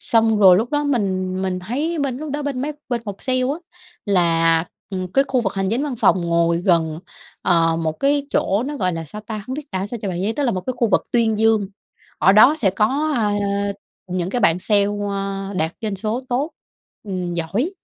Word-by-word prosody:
Xong 225 -2 +2
rồi 185 -3 +8
lúc 225 +4 0
đó 295 0 0
mình 190 -7 -1
mình 185 -1 -1
thấy 290 - -2
bên 270 -3 -1
lúc 305 -1 -6
đó 295 0 -2
bên 275 -3 -3
mấy 300 +1 -2 0.2
bên 240 -2 -2
phòng 205 - -5
sale 255 -1 0
á, 255 - +1 0.6
là, 165 -3 +3 0.3
ừm, 185 -1 -4
cái 275 +4 +4
khu 255 -2 +2
vực 195 -4 -1
hành 195 0 -1
chính 240 +5 0
văn 290 -3 -2
phòng 185 - +4
ngồi 170 0 +1
gần, 165 -3 +1 0.4
ờ, 165 -2 +3
một 160 -1 -1
cái 285 0 +2
chỗ, 200 +4 +1
nó 295 - -4
gọi 185 -7 0
là 165 0 -4
sao 210 +8 -9
ta, 215 -1 -6
hông 260 - -4
biết 295 -1 -8
tả 190 0 -2
sao 235 +2 -6
cho 200 - -2
bạn 180 0 -3
dễ, 215 - 0
tức 290 - 0
là 250 - +2
một 185 - -2
cái 255 +4 -4
khu 240 -2 +1
vực - - +2
tuyên 225 -3 +2
dương, 220 -3 +3 0.5
ở 190 - +5
đó 220 +9 +7
sẽ 200 -8 +2
có, 270 +11 +1
a, 210 -3 +1 0.7
những 180 0 -2
cái 245 - -1
bạn 175 -3 +4
sale, 205 +1 +3 0.3
a, 195 0 -3
đạt 160 +2 0
doanh 210 -3 -3
số 220 +6 -2
tốt, 270 +6 -1 0.5
ừm, 180 -4 -4
giỏi 195 - -1
205 Hz, 225 wpm, -21 LUFS, 185-255 Hz, 0.7 s, rồi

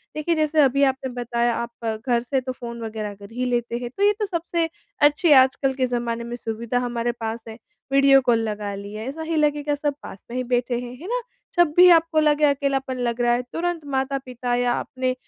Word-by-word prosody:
देखिए 315 +2 0
जैसे 310 0 +2
अभी 275 +1 +3
आपने 265 -1 +1
बताया 240 -1 0
आप 235 -1 -4
घर 240 -2 +2
से 265 +1 -1
तो 255 0 -4
फ़ोन 235 -1 -8
वग़ैरह 215 -2 -4
कर 200 +1 -13
ही 250 +1 -2
लेते 240 -1 -1
हैं 240 0 -5
तो 400 - +1
ये 410 +1 +5
तो 425 - +1
सबसे 340 -3 -2 0.3
अच्छी 295 +3 +4
आजकल 265 0 +5
के 255 -1 0
ज़माने 235 -1 -2
में 240 +1 -5
सुविधा 235 +1 -3
हमारे 240 -1 -1
पास 225 -1 -5
है। 220 - -9 0.4
वीडियो 275 0 +6
कॉल 240 -3 +2
लगा 205 -1 -4
लिया 205 +2 -7
ऐसा 275 +6 -6
ही 325 0 -2
लगेगा 295 -1 +1
सब 290 0 -1
पास - - -8
में 245 - -5
ही 255 - -1
बैठे 245 0 0
हैं, 245 0 -7
है 355 - -7
ना? - - -1 0.4
जब 345 -4 +4
भी 360 0 +9
आपको 330 -2 +4
लगे 300 -1 +2
अकेलापन 275 -2 0
लग 240 0 -1
रहा 240 0 +3
है 240 - +1
तुरंत 345 0 -2
माता-पिता 265 -3 -2
या 245 0 +1
अपने 255 0 -2
255 Hz, 215 wpm, -23 LUFS, 235-295 Hz, 0.4 s, भी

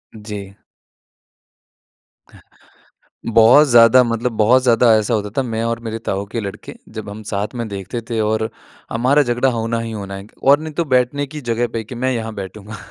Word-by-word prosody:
जी। 105 -2 -8 2.8
बहुत 115 +7 +7
ज़्यादा 120 +1 +7
मतलब 115 +1 -2
बहुत 120 +5 +4
ज़्यादा 120 -1 +4
ऐसा 110 +2 0
होता 105 -1 -2
था। - - +3
मैं 115 -3 -3
और 115 0 -2
मेरे 115 -1 -5
ताऊ 100 +1 -1
के 115 - -2
लड़के 100 -2 -7 0.2
जब 110 -2 -7
हम 105 +2 -9
साथ 105 +3 -3
में 120 -1 -3
देखते 100 +3 -5
थे 115 - -1
और 110 +1 0 0.4
हमारा 130 +6 +3
झगड़ा 120 0 +1
होना 115 -1 -2
ही 115 0 -5
होना 100 -2 -6
है 95 +1 -9 0.2
और 140 +2 +5
नहीं 155 0 -6
तो - - +1
बैठने 130 +1 +1
की 150 +2 -8
जगह 120 -2 -1
पे 115 - -2
कि 120 - -9
मैं 130 +2 -1
यहाँ 115 -2 -4
बैठूँगा 105 +2 -8
115 Hz, 180 wpm, -19 LUFS, 105-125 Hz, 2.8 s, बहुत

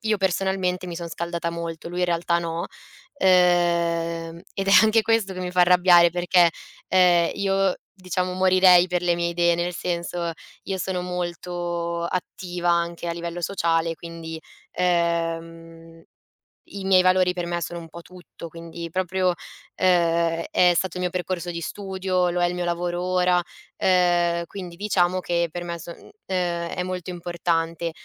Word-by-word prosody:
io 220 -2 +1
personalmente 190 -1 0
mi 175 - -6
sono 170 0 -5
scaldata 170 0 -3
molto, 170 -1 -6
lui 175 - -5
in 180 - +2
realtà 170 0 +1
no. 170 0 -3 0.5
Ehm, 170 -2 +2
ed 195 - -3
è - - +4
anche 220 +1 +4
questo 220 -3 +1
che 185 - -6
mi 180 -1 -3
fa 180 0 +1
arrabbiare 175 -1 +6
perché, 175 0 +3 0.4
ehm, 180 -2 +4
io 195 -1 +1 0.2
diciamo 185 -1 -3
morirei 185 -1 +5
per 180 0 0
le 175 -1 +2
mie 170 0 -1
idee, 170 0 +2
nel 175 +1 -2
senso 170 -1 -3 0.3
io 195 - -3
sono 185 -1 -2
molto 175 -1 -3
attiva 175 0 -3
anche 170 0 -1
a - - -1
livello 170 +1 -5
sociale, 165 -2 0
quindi, 165 -1 -8 0.3
ehm, 165 -1 -2 0.7
i 200 -1 -6
miei 190 -1 +5
valori 185 0 +3
per 175 -1 -4
me 175 0 -2
sono 170 +1 -5
un 165 -1 -11
po' 170 +2 -10
tutto, 175 -1 -12
quindi 165 +1 -8
proprio, 185 0 0 0.4
ehm, 170 -2 +2
è 180 -1 +5
stato 185 +1 -1
il - - -3
mio 180 - 0
percorso 180 -1 -3
di 170 - -5
studio, 190 0 -2
lo 175 +1 -1
è 175 - +3
il 175 - -3
mio 180 0 -3
lavoro 175 0 -2
ora, 180 -1 +2 0.4
ehm, 175 -2 +2
quindi 180 -1 -8
diciamo 185 -2 +1
che 170 -1 0
per 175 +2 -5
me 170 -1 -5
son 170 +1 -9 0.3
ehm, 175 -2 -1
è 180 - -3
molto 185 0 -5
importante 170 -1 -2
175 Hz, 165 wpm, -24 LUFS, 170-180 Hz, 0.7 s, arrabbiare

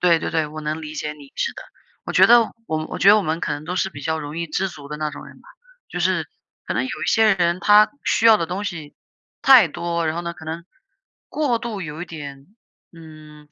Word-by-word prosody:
对 170 -2 +4
对 - - -4
对， 160 -2 0
我 155 +1 -8
能 155 +1 -4
理 155 0 -7
解 150 0 -4
你， 145 -2 -15
是 470 - -1
的。 - - -9 0.4
我 - - -5
觉 - - +6
得 240 0 +7 0.3
我 155 0 -1
们 155 - -4
我 - - -6
觉 195 - +4
得 210 - +8
我 210 - +1
们 160 -2 -2
可 - - -2
能 145 +1 -5
都 180 +3 -4
是 190 - 0
比 140 - -10
较 160 +2 -1
容 150 +1 -7
易 170 - -2
知 190 +5 -1
足 145 -4 -12
的 150 - -5
那 155 0 -2
种 - - -10
人 - - -14
吧。 - - -20 0.4
就 - - -5
是 - - +1 0.4
可 - - -2
能 - - +1
有 260 - -5
一 - - -2
些 220 -3 +4
人， 175 -1 0
他 210 +3 +6
需 230 - +2
要 225 - +8
的 165 -5 -2
东 190 +4 -4
西 160 -7 -6 0.5
太 255 -10 +7
多， 170 +1 -3
然 155 +1 -1
后 170 - -3
呢 170 0 -4
可 160 -1 -13
能 165 +2 -6 0.6
过 275 -6 0
度 225 -5 -5
有 155 +1 -6
一 - - -4
点， 140 -4 -9 0.5
嗯， 155 -2 -14
165 Hz, 275 characters per minute, -21 LUFS, 155-195 Hz, 0.6 s, 得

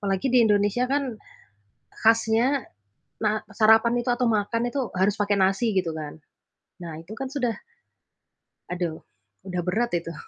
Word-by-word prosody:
Apalagi 195 +3 -1
di 250 -2 +5
Indonesia 205 +2 +2
kan 270 -4 -1 0.8
khasnya 225 +4 +2 0.6
ma 215 0 +1
sarapan 220 +3 +4
itu 245 - -1
atau 250 0 0
makan 230 +3 0
itu 275 - -2
harus 190 +2 +2
pakai 205 0 +1
nasi 195 +4 +2
gitu 185 -3 +1
kan. 155 0 -7 0.6
Nah 165 -2 -7
itu 185 +6 -10
kan 265 +3 -5
sudah 250 -5 -1 1.2
aduh 175 -3 -3 0.4
udah 180 -2 -3
berat 220 +7 0
itu. 165 0 -6
215 Hz, 140 wpm, -25 LUFS, 190-240 Hz, 1.2 s, di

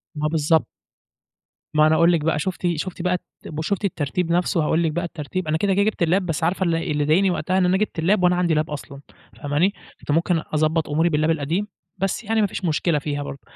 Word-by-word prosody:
ما 150 0 -1
بالضبط. 160 0 +2 1.1
ما 155 0 +6
أنا 160 - +4
هاقول 170 +2 +5
لِك 165 -3 +2
بقى، 155 -1 0
شُفتِ 180 +2 -2
شُفتِ 180 +3 -5
بقى 180 +1 +1 0.3
الت 155 - -7
شُفتِ 200 +4 -1
الترتيب 165 0 -2
نَفْسه 175 -1 +1
هاقول 160 +2 +1
لِك 160 - +1
بقى 175 +3 -2
الترتيب، 170 +2 -5
أنا 155 - +1
كده 195 +3 +1
كده 200 - +3
جِبت 215 -4 0
الlap 170 +3 +3
بس 165 -1 -2
عارفة 180 +3 +1
الل 170 -1 +1
اللي 150 -3 -1
ضايقني 185 +6 +3
وقتها 185 +1 -1
إن 185 - +3
أنا 180 +1 +3
جِبت 200 -5 -2
الlap 185 +3 +2
وأنا 180 0 +4
عَندي 175 -3 +1
lap 155 +1 0
أصلًا، 140 -1 -7 0.3
فاهماني؟ 150 +7 0 0.3
كنت - - -4
ممكن 165 +1 +2
أضبّط 155 +1 +1
أموري 160 +4 +2
بالlap 155 0 +1
القديم 165 +6 -1 0.3
بس 195 +5 -2
يعني 220 +1 +1
ما 205 - +3
فيش 190 - -5
مشكلة 155 -1 +1
فيها 145 0 -3
برضو، 140 - -8
165 Hz, 225 wpm, -22 LUFS, 155-180 Hz, 1.1 s, ما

